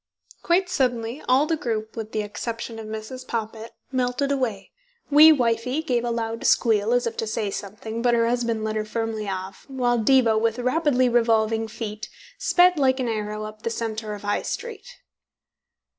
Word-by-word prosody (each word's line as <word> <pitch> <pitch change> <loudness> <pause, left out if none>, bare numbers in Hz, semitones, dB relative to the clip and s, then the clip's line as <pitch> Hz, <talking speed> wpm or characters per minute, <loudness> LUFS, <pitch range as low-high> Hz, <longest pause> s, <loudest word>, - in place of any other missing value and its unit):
Quite 360 +2 +2
suddenly 250 -6 -1
all 260 +3 +5
the 325 +1 0
group, 220 -6 -3
with 220 -1 -6
the 215 - -1
exception 230 +2 -5
of 220 - -7
Mrs. 220 +4 -6
Poppit, 225 0 -4 0.2
melted 255 +2 0
away. 235 -8 -2 0.4
Wee 305 +2 +9
wifie 250 +1 +1
gave 245 -6 0
a 240 - -1
loud 230 -1 -3
squeal, 220 -2 +3
as 245 0 +2
if 230 - -3
to 225 - -2
say 215 -2 -2
something, 220 +3 -6
but 240 0 +3
her 230 0 +2
husband 235 -2 0
led 220 0 -2
her 215 - 0
firmly 220 -1 -3
off, 190 0 -6
while 245 -3 0
Diva, 230 -1 +4
with 225 +1 0
rapidly 255 0 +2
revolving 225 -2 +2
feet, 215 -1 -6 0.3
sped 360 -2 +4
like 260 -1 +3
an 255 - -1
arrow 215 -1 -3
up 215 0 -8
the 230 - -2
centre 220 -2 -4
of 205 - -10
the 205 - -8
High 205 - +1
Street. 470 -1 -6
230 Hz, 180 wpm, -24 LUFS, 220-255 Hz, 0.4 s, Wee